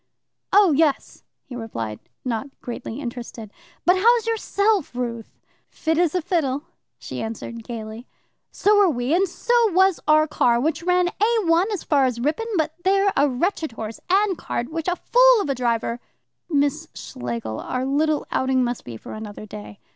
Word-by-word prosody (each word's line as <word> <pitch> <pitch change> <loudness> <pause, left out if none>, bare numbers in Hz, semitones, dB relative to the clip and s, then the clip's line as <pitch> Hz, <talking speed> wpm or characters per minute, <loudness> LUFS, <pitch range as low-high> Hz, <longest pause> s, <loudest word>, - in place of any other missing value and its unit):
"Oh, 400 -3 +6
yes," 300 -1 +1 0.2
he 250 - -9
replied, 115 - -5 0.3
not 240 +1 -2
greatly 240 0 -6
interested. 235 -4 -7 0.3
"But 360 +2 +5
how's 460 +3 +4
yourself, 415 - 0
Ruth?" 235 -2 -4 0.4
"Fit 320 0 -1
as 345 -1 +2
a 360 - 0
fiddle," 290 -5 0 0.3
she - - -6
answered 225 +1 -6
gaily. 225 +1 -7 0.4
"So 410 +1 +3
are 390 - +5
we 245 0 -1
and 380 +3 +3
so 475 - -2 0.2
was 380 0 +4
our 310 0 +5
car, 240 -5 +2
which 305 +4 -1
ran 360 0 +2
A 445 +4 +1
1 340 +6 +3
as 405 - -3
far 280 -3 +3
as 250 -2 -1
Ripon, 310 - -1
but 315 -1 0
there 390 +1 +3
a 285 +1 +3
wretched 315 - -1
horse 220 0 -6
and 390 -1 +2
cart 240 +5 -4
which 325 +1 -4
a 360 - +1
fool - - +5
of 340 -9 -1
a - - +1
driver 235 -1 -1 0.3
" - - -56
"Miss 285 -3 0
Schlegel, 115 -3 -5
our 255 0 -3
little 300 +2 +1
outing 260 -1 +1
must 240 -1 -3
be 115 -2 -8
for - - -10
another 215 -1 -8
day." 210 0 -10
290 Hz, 175 wpm, -23 LUFS, 235-365 Hz, 0.4 s, Oh